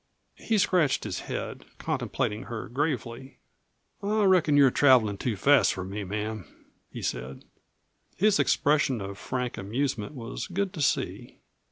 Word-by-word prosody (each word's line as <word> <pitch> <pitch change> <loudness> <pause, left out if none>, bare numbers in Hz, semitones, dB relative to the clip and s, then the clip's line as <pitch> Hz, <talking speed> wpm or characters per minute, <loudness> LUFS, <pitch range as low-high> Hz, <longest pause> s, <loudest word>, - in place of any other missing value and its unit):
He 225 - 0
scratched 175 -7 +2
his 95 -5 -4
head, - - -5
contemplating 105 +3 -2
her 115 -3 -6
gravely. 130 -1 -3 0.6
"I 210 +1 +1
reckon 180 -7 +4
you're 140 -3 +6
travelin' 120 -9 +4
too 120 -4 -1
fast 140 +7 +4
for 95 - -4
me, 100 +3 -5
ma'am," 105 +1 -4 0.5
he - - -7
said. 65 +1 -4 0.7
His 210 +2 +3
expression 145 -4 +2
of 100 0 -7
frank 125 -1 -3
amusement 120 +5 -2
was 120 0 -6
good 190 +1 -2
to 160 - -5
see. 140 - -1
130 Hz, 140 wpm, -27 LUFS, 105-150 Hz, 0.7 s, you're